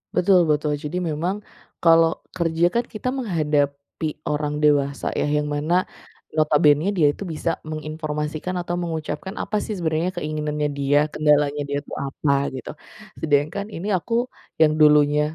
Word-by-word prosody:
Betul 185 0 +5
betul. 150 0 +1
Jadi 150 +5 -3
memang 170 +6 -1 0.5
kalau 165 0 +6 0.3
kerja 165 0 +1
kan 235 0 +2
kita 215 +4 -5
menghadapi 150 - -1 0.2
orang 150 0 -1
dewasa 140 -1 +2
ya, - - 0
yang 150 - 0
mana 170 +5 +1 0.5
notabenenya 150 +2 +3
dia 150 -3 +5
itu - - -8
bisa 165 - -2 0.2
menginformasikan 155 +2 -4
atau 175 0 -4
mengucapkan 165 +1 -4
apa 210 - -3
sih 215 - -4
sebenarnya 165 +1 0
keinginannya 150 -1 -2
dia, 140 +1 +2 0.2
kendalanya 150 -1 +2
dia 140 - -1
itu - - -12
apa, 140 +1 -1 0.2
gitu, 130 - -7 0.5
sedangkan 155 +6 +1
ini 180 +5 -5
aku 230 +7 -5 0.5
yang 155 -1 +6
dulunya 150 -1 +5
155 Hz, 140 wpm, -23 LUFS, 150-170 Hz, 0.5 s, kalau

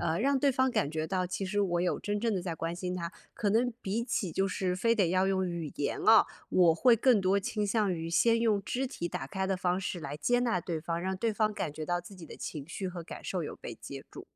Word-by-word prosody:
呃， 165 0 0
让 275 +3 +2
对 280 +1 +3
方 260 +1 +2
感 145 -10 0
觉 155 0 -2
到， 185 0 0
其 185 +2 -3
实 205 +2 0
我 175 -3 +1
有 180 0 0
真 205 0 -2
正 230 -3 +1
地 185 - 0
在 175 -2 -3
关 165 +1 -3
心 180 0 -3
他， 170 -1 -4 0.2
可 205 - 0
能 240 +4 +2
比 205 +4 -1
起 200 -7 -1
就 195 - +1
是 185 -1 -1
非 230 +6 +2
得 195 -6 +2
要 185 +1 +3
用 190 -1 +1
语 170 -4 -4
言 145 - -1
啊， 225 -1 +8 0.2
我 175 -3 +5
会 240 +8 +5
更 235 -2 +4
多 190 +1 +3
倾 210 +1 -1
向 205 -2 +1
于 165 -1 -4
先 230 +7 +3
用 210 -4 +2
肢 260 +5 -1
体 175 -10 -4
打 135 - -4
开 190 +4 -2
的 190 -1 0
方 180 0 0
式 185 -1 -3
来 145 -1 -5
接 245 +10 +2
纳 230 -7 +1
对 170 -2 -3
方， 165 +2 -2
让 190 +2 -2
对 225 +4 0
方 215 0 +1
感 155 - -3
觉 155 +1 -5
到 175 +1 0
自 175 +3 -12
己 180 -3 -10
的 - - -10
情 145 -3 -6
绪 185 +3 -4
和 175 -1 -6
感 165 - -9
受 180 -3 -2
有 - - -5
被 120 - -7
接 135 +3 -9
住。 - - -9
185 Hz, 295 characters per minute, -30 LUFS, 170-215 Hz, 0.2 s, 啊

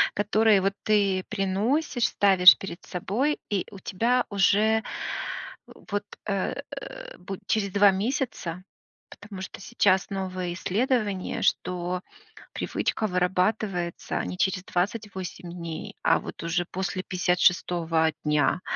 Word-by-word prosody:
Которые 210 0 +3
вот 195 +1 +1
ты 200 -3 +2
приносишь, 225 +7 0
ставишь 190 -2 +7
перед 190 -2 -8
собой, 230 - -1
и 200 -3 0
у 200 - -10
тебя 235 +7 +1
уже 210 +3 +3 0.8
вот, 205 0 -5 0.2
э, 195 -2 -1 0.6
бу 190 +1 -7
через 200 -3 0
2 200 0 +6
месяца. 195 - -2 0.5
Потому 205 -2 -10
что - - -7
сейчас 195 -4 +2
новые 185 -2 -3
исследования, 205 0 -1
что 180 0 0 0.5
привычка 215 - -1
вырабатывается 180 0 0
не 180 - -5
через 185 -1 0
28 190 -2 -3
дней, 175 +4 -6
а - - +4
вот - - -8
уже 175 +1 0
после 185 +1 -3
56 175 -3 +2
дня, 150 +3 +2
190 Hz, 110 wpm, -26 LUFS, 180-210 Hz, 0.8 s, ставишь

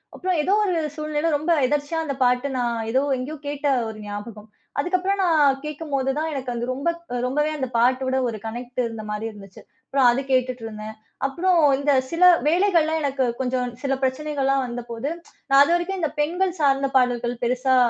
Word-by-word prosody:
அப்புறம் 365 -2 -1
ஏதோ 380 +6 +1
ஒரு 365 - 0 0.2
சூழ்நிலையில, 305 +1 -1
ரொம்ப 310 +4 -1
எதேர்ச்சியா 295 +4 -1
அந்த 280 -3 -3
பாட்டு 250 +2 +2
நான் 235 -1 0
ஏதோ 260 +2 +3 0.2
எங்கயோ 290 +5 -5
கேட்ட 290 0 -2 0.2
ஒரு 215 - -8
ஞாபகம். 210 +1 -8 0.3
அதுக்கப்புறம், 370 +5 0
நான் 295 -6 +3
கேக்கும்போதுதான் 295 0 -2
எனக்கு 255 -2 -4
அது 235 0 -3
ரொம்ப 280 +6 -1
க் 340 -7 -11
ரொம்பவே 295 +4 0
அந்த 260 -2 -2
பாட்டோட 260 +2 +2
ஒரு 220 -2 -3
கனெக்ட் 245 +2 -6
இருந்த 225 -2 -6
மாதிரி 210 +1 -3
இருந்துச்சு. 200 -2 -13 0.3
அப்புறம் 270 -2 +3
அது 255 +3 0
கேட்டுட்டு 255 -2 +1
இருந்தேன். 215 0 -7 0.3
அப்புறம் 345 +5 +2 0.2
இந்த 285 +1 +1 0.2
சில 335 +2 0 0.2
வேலைகள்ல 335 -2 +3
எனக்கு 270 -2 0
கொஞ்சம் 250 -1 -1
சில 275 -1 0
பிரச்சனைகள்லாம் 275 0 0
வந்தபோது, 240 +2 -5 0.4
நான் 275 0 +7
அதுவரைக்கும் 345 +4 0
இந்த 315 -3 0
பெண்கள் 355 +5 +1
சார்ந்த 275 -1 +2
பாடல்கள் 245 -1 +1
பெருசா 255 +2 +2
275 Hz, 165 wpm, -23 LUFS, 245-310 Hz, 0.4 s, நான்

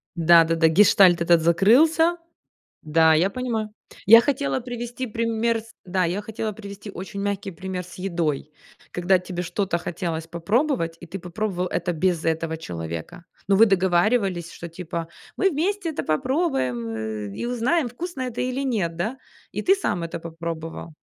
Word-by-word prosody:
Да-да-да. 165 -1 +5
Гештальт 185 0 +5
этот 170 -1 +4
закрылся. 310 - +4 0.7
Да, 160 +1 +4
я 175 +5 +3
понимаю. 225 -3 -3 0.4
Я 230 +3 +10
хотела 280 0 -1
привести 245 +1 -5
пример 230 0 0
с 225 +1 -17
да, 185 0 0
я 180 +5 -1
хотела 220 0 -4
привести 200 0 -9
очень 195 +1 -7
мягкий 200 -1 -2
пример 185 0 -5
с 175 - -13
едой. 170 -6 -2 0.4
Когда 180 +1 +3
тебе 180 -1 -5
что-то 190 0 -1
хотелось 165 -1 -4
попробовать, 170 - 0
и 170 - -10
ты 195 +4 -6
попробовал 180 +1 -3
это 175 0 -2
без 170 0 0
этого 160 0 -1
человека. 85 - -7 0.2
Но 195 - +4
вы 225 - +7
договаривались, 190 -1 +1
что, 170 - -8
типа, 170 -1 -5 0.3
мы 390 - +3
вместе 355 +3 -1
это 305 - -4
попробуем, 155 - 0 0.5
э, - - -10
и - - -4
узнаем, 245 +5 +1
вкусно 285 +3 -6
это 250 -2 -4
или 255 +1 -1
нет, 190 -10 -1
да, 220 +10 -3 0.3
и - - -3
ты 385 - +5
сам 175 - -2
это 165 0 -5
попробовал. 165 -1 -6
190 Hz, 155 wpm, -24 LUFS, 170-235 Hz, 0.7 s, Я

